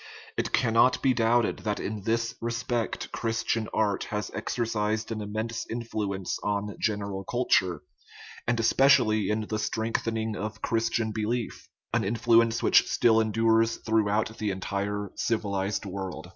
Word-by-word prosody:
It - - -2
cannot 115 +2 +3
be 135 -2 +4
doubted 115 0 +2
that 105 -1 -2
in 105 0 -4
this 115 0 0
respect 115 0 -2
Christian 115 -1 -1
art 105 -2 0
has 105 0 -4
exercised 110 -2 -1
an 110 -1 -3
immense 110 +2 -3
influence 105 -5 -3
on 105 0 -2
general 100 -2 -2
culture, 95 -8 +1 0.6
and 115 0 +1
especially 115 -4 +4
in 105 +1 +1
the 110 0 -3
strengthening 110 0 -1
of 110 +3 -5
Christian 115 -1 0
belief 110 +2 -3 0.2
an - - +2
influence 115 +2 +3
which - - +5
still 115 -1 +4
endures 115 +1 +2
throughout 110 0 0
the 105 - -1
entire 100 +1 -3
civilized 100 -3 -1
world. 95 -2 -6
110 Hz, 130 wpm, -27 LUFS, 105-115 Hz, 0.6 s, which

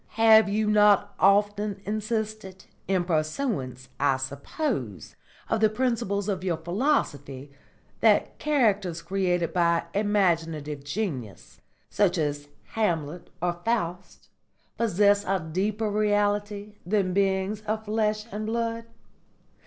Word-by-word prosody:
Have 220 -2 +6
you 215 +2 0
not 210 -1 +4
often 205 +1 +2
insisted, 215 -2 -4 0.2
in 190 -2 +1
pursuance, 155 - -2
I 140 -2 +2
suppose, 135 - -4 0.3
of - - 0
the 215 0 +4
principles 220 -4 -1
of 190 -3 -2
your 175 -3 0
philosophy, 160 - -1 0.5
that - - +2
characters 205 - +1
created 180 -1 0
by 170 -1 +2
imaginative 165 -8 0
genius, 145 - -5 0.3
such 190 -3 +2
as 145 -2 -2 0.2
Hamlet 170 -6 -2
or 175 -1 -1
Faust, 180 -6 -3 0.5
possess 205 -2 +3
a 195 -1 0
deeper 200 +7 -2
reality 205 0 0
than 185 0 0
beings 195 +2 0
of 215 +1 -2
flesh 215 0 0
and 215 +1 -4
blood? 230 0 -2
200 Hz, 110 wpm, -26 LUFS, 170-215 Hz, 0.5 s, Have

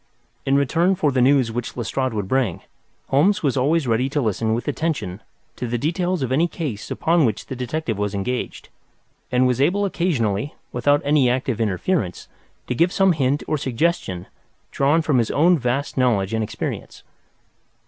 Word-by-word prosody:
In 135 - +3
return 165 +7 +2
for 155 -6 +1
the 130 -1 +1
news 130 -2 +4
which 120 +1 -5
Lestrade 130 +2 -1
would 100 -3 -2
bring, 125 -7 0 0.5
Holmes 175 +9 +3
was 140 -3 +1
always 145 +4 +2
ready 125 +2 +1
to 145 - -1
listen 110 -2 0
with 120 - -4
attention 145 - -2 0.4
to 125 - -3
the 120 +1 -1
details 175 +4 -1
of 130 - -2
any 160 +6 +3
case 140 -12 -5
upon 165 0 +2
which 110 -6 0
the 130 - -6
detective 125 -3 -3
was 105 0 -1
engaged, 120 +6 -3 0.6
and 125 +1 +3
was 125 0 +1
able 200 +8 +2
occasionally, 140 - -1 0.2
without 145 +4 +2
any 145 -3 +4
active 125 -2 -1
interference, 105 - -1 0.4
to - - -2
give 170 +8 +2
some 195 -1 +3
hint 145 -2 0
or 155 - 0
suggestion 125 - -1 0.5
drawn 150 +4 +2
from 145 -5 +2
his 115 - 0
own 170 +3 +4
vast 130 +3 -1
knowledge 115 -6 +2
and 110 0 0
experience. 105 - -5
130 Hz, 170 wpm, -22 LUFS, 115-155 Hz, 0.6 s, news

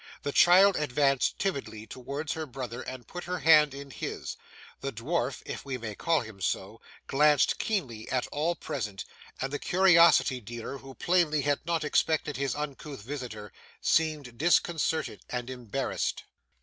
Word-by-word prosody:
The 145 - -1
child 185 +5 +6
advanced 140 -2 +1
timidly 135 - -3
towards 140 +6 -5
her 160 -1 -5
brother 125 -2 -6
and 130 -2 -7
put 175 - -7
her 180 +1 -2
hand 150 -4 +5
in 140 0 -9
his, - - -5 0.4
the 140 - -3
dwarf 130 +3 -2
(if - - -6
we 135 -2 -4
may 110 -3 -6
call 165 +8 +1
him 110 -4 -10
so) - - -2 0.2
glanced 150 0 +3
keenly 130 - -2
at 130 -1 0
all 160 +4 0
present, 105 - -5 0.3
and 135 +1 -3
the 145 - -2
curiosity 170 -8 +5
dealer, 120 +5 -7
who 135 0 -12
plainly 170 -4 +2
had 145 0 +1
not 165 -2 0
expected 150 0 +1
his 140 -2 -1
uncouth 145 -4 -6
visitor, 115 -6 -7 0.3
seemed 150 -7 0
disconcerted 160 -1 +1
and 125 0 -4
embarrassed. 125 -5 -3
140 Hz, 150 wpm, -29 LUFS, 125-160 Hz, 0.4 s, child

